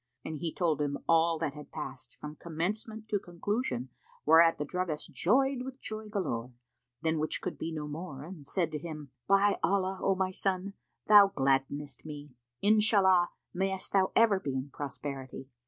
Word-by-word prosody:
and 155 Hz, -, -4 dB
he 165 Hz, -1 st, -2 dB
told 160 Hz, -4 st, 0 dB
him 145 Hz, -1 st, -1 dB
all 165 Hz, 0 st, +4 dB
that 155 Hz, -3 st, -2 dB
had 150 Hz, -1 st, -11 dB
passed, 130 Hz, -5 st, -7 dB
from 150 Hz, 0 st, -8 dB
commencement 210 Hz, +8 st, -4 dB
to 210 Hz, -2 st, 0 dB
conclusion, 175 Hz, -, -3 dB, 0.4 s
whereat 165 Hz, +2 st, +6 dB
the 145 Hz, -, -2 dB
druggist 175 Hz, -2 st, -3 dB
joyed 265 Hz, +6 st, +2 dB
with 265 Hz, +1 st, -7 dB
joy 215 Hz, 0 st, -6 dB
galore, 125 Hz, -, -3 dB, 0.5 s
than 160 Hz, -1 st, +1 dB
which 155 Hz, 0 st, -1 dB
could -, -, -4 dB
be 165 Hz, -, -4 dB
no 155 Hz, -2 st, -4 dB
more 150 Hz, -2 st, -6 dB
and 155 Hz, -3 st, -10 dB
said 170 Hz, -2 st, 0 dB
to 150 Hz, -, -3 dB
him, 150 Hz, -4 st, -7 dB, 0.2 s
"By 195 Hz, +1 st, +4 dB
Allah, 190 Hz, +2 st, +1 dB
O 195 Hz, -, +2 dB
my 185 Hz, 0 st, 0 dB
son, 190 Hz, +1 st, -1 dB, 0.3 s
thou 205 Hz, -1 st, +9 dB
gladdenest 135 Hz, -3 st, -1 dB
me! 150 Hz, -2 st, -8 dB, 0.3 s
Inshallah, 200 Hz, -4 st, +5 dB, 0.2 s
mayst 190 Hz, +1 st, -2 dB
thou 190 Hz, -1 st, +3 dB
ever 220 Hz, -4 st, +5 dB
be 140 Hz, -7 st, -3 dB
in 135 Hz, +2 st, -4 dB
prosperity! 135 Hz, -2 st, -6 dB
165 Hz, 170 wpm, -30 LUFS, 150-195 Hz, 0.5 s, thou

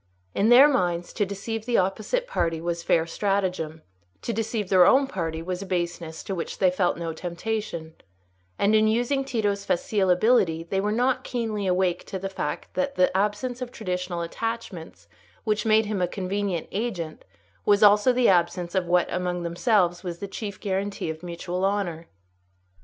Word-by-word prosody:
In 210 Hz, +3 st, +2 dB
their 255 Hz, +4 st, +9 dB
minds, 175 Hz, -10 st, 0 dB
to 205 Hz, -3 st, 0 dB
deceive 220 Hz, +3 st, -5 dB
the 240 Hz, -, +2 dB
opposite 215 Hz, -, 0 dB
party 165 Hz, -, -1 dB
was 170 Hz, +1 st, -3 dB
fair 165 Hz, -1 st, +2 dB
stratagem; 180 Hz, -4 st, -2 dB, 0.4 s
to 235 Hz, -, -2 dB
deceive 220 Hz, -2 st, -2 dB
their 185 Hz, -2 st, +6 dB
own 275 Hz, +1 st, +5 dB
party 165 Hz, -9 st, -4 dB
was 180 Hz, +1 st, -4 dB
a -, -, -5 dB
baseness 175 Hz, -3 st, -3 dB
to 195 Hz, -, -4 dB
which 170 Hz, -3 st, -4 dB
they 185 Hz, -2 st, +3 dB
felt 180 Hz, -2 st, +1 dB
no 165 Hz, -1 st, -4 dB
temptation; 170 Hz, -1 st, -4 dB, 0.6 s
and, 205 Hz, +2 st, +2 dB
in 215 Hz, 0 st, +5 dB
using 245 Hz, +5 st, +1 dB
Tito's 210 Hz, -6 st, -1 dB
facile 200 Hz, -1 st, 0 dB
ability, 180 Hz, -4 st, +3 dB
they 190 Hz, +3 st, -1 dB
were 210 Hz, +1 st, 0 dB
not 255 Hz, +3 st, +1 dB
keenly 220 Hz, -5 st, -2 dB
awake 180 Hz, -1 st, +1 dB
to 190 Hz, -, -4 dB
the 195 Hz, +1 st, -4 dB
fact 190 Hz, -, -4 dB
that 275 Hz, 0 st, -1 dB
the 180 Hz, 0 st, +2 dB
absence 210 Hz, +6 st, -1 dB
of 250 Hz, -1 st, -4 dB
traditional 180 Hz, -5 st, -3 dB
attachments 200 Hz, -2 st, -5 dB, 0.4 s
which 215 Hz, -1 st, 0 dB
made 220 Hz, 0 st, +4 dB
him 205 Hz, -3 st, -2 dB
a 180 Hz, -, +2 dB
convenient 190 Hz, -1 st, -2 dB
agent 190 Hz, -8 st, -4 dB, 0.4 s
was 205 Hz, +1 st, +4 dB
also 210 Hz, +4 st, +6 dB
the 245 Hz, -1 st, +3 dB
absence 175 Hz, -1 st, +2 dB
of 185 Hz, -2 st, 0 dB
what 175 Hz, 0 st, +3 dB
among 180 Hz, -1 st, -2 dB
themselves 175 Hz, 0 st, +1 dB
was 175 Hz, -2 st, -4 dB
the 200 Hz, -, -6 dB
chief 200 Hz, 0 st, -6 dB
guarantee 195 Hz, -3 st, -2 dB
of 160 Hz, 0 st, -9 dB
mutual 175 Hz, +1 st, -4 dB
honour. 185 Hz, -5 st, -1 dB
195 Hz, 175 wpm, -25 LUFS, 175-220 Hz, 0.6 s, their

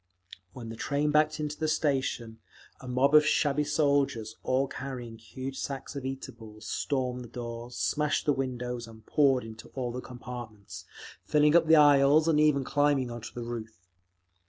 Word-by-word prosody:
When 120 Hz, -3 st, -8 dB
the 115 Hz, -, -6 dB
train 145 Hz, +5 st, 0 dB
backed 155 Hz, +1 st, +2 dB
into 150 Hz, 0 st, -4 dB
the 155 Hz, -, 0 dB
station, 130 Hz, -7 st, -1 dB, 0.4 s
a 130 Hz, -, -11 dB
mob 130 Hz, +3 st, +2 dB
of 150 Hz, 0 st, +8 dB
shabby 150 Hz, -1 st, +2 dB
soldiers, 140 Hz, -8 st, +1 dB
all 130 Hz, +2 st, +1 dB
carrying 125 Hz, -4 st, -7 dB
huge 130 Hz, +4 st, -7 dB
sacks 140 Hz, +1 st, -5 dB
of 140 Hz, -, -5 dB
eatables, 110 Hz, -5 st, -8 dB
stormed 125 Hz, -1 st, -2 dB
the -, -, -10 dB
doors, 120 Hz, 0 st, -7 dB
smashed 150 Hz, -1 st, 0 dB
the 145 Hz, -, +3 dB
windows, 125 Hz, -3 st, -4 dB
and 110 Hz, -1 st, -14 dB
poured 135 Hz, -4 st, +3 dB
into 110 Hz, 0 st, -10 dB
all 125 Hz, -3 st, -2 dB
the 125 Hz, +1 st, -5 dB
compartments, 110 Hz, -7 st, -9 dB, 0.4 s
filling 150 Hz, +1 st, +3 dB
up 170 Hz, -2 st, +5 dB
the 160 Hz, -, +7 dB
aisles 145 Hz, +1 st, +6 dB
and 155 Hz, -2 st, +3 dB
even 150 Hz, -3 st, +3 dB
climbing 145 Hz, -3 st, +1 dB
onto 120 Hz, -1 st, -7 dB
the 120 Hz, -, -6 dB
roof. 110 Hz, -2 st, -6 dB
130 Hz, 165 wpm, -29 LUFS, 120-145 Hz, 0.4 s, of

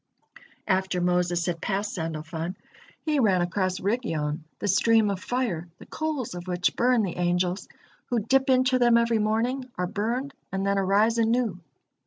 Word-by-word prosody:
After 190 Hz, -2 st, +1 dB
Moses 175 Hz, -1 st, +1 dB
had 175 Hz, -2 st, -2 dB
passed 200 Hz, +2 st, -2 dB
Sandalfon, 160 Hz, +1 st, -4 dB, 0.5 s
he 305 Hz, -3 st, 0 dB
ran 190 Hz, -7 st, +3 dB
across 185 Hz, +1 st, -1 dB
Rigyon, 165 Hz, -8 st, -2 dB
the 205 Hz, -, -3 dB
stream 215 Hz, +2 st, +4 dB
of 195 Hz, -, -3 dB
fire, 220 Hz, -10 st, -2 dB
the -, -, -13 dB
coals 310 Hz, -, -3 dB
of 175 Hz, 0 st, -7 dB
which 180 Hz, -1 st, 0 dB
burn 245 Hz, -2 st, +3 dB
the 180 Hz, -4 st, -3 dB
angels, 180 Hz, +1 st, 0 dB, 0.4 s
who 245 Hz, -, 0 dB
dip 265 Hz, +5 st, +2 dB
into 255 Hz, 0 st, +4 dB
them 240 Hz, -1 st, +5 dB
every 230 Hz, -1 st, +2 dB
morning, 240 Hz, +5 st, 0 dB
are 180 Hz, -, 0 dB
burned, 230 Hz, +8 st, -2 dB, 0.2 s
and 195 Hz, 0 st, -2 dB
then 200 Hz, 0 st, +2 dB
arise 205 Hz, +4 st, +3 dB
anew. 225 Hz, -4 st, +1 dB
200 Hz, 160 wpm, -26 LUFS, 180-235 Hz, 0.5 s, them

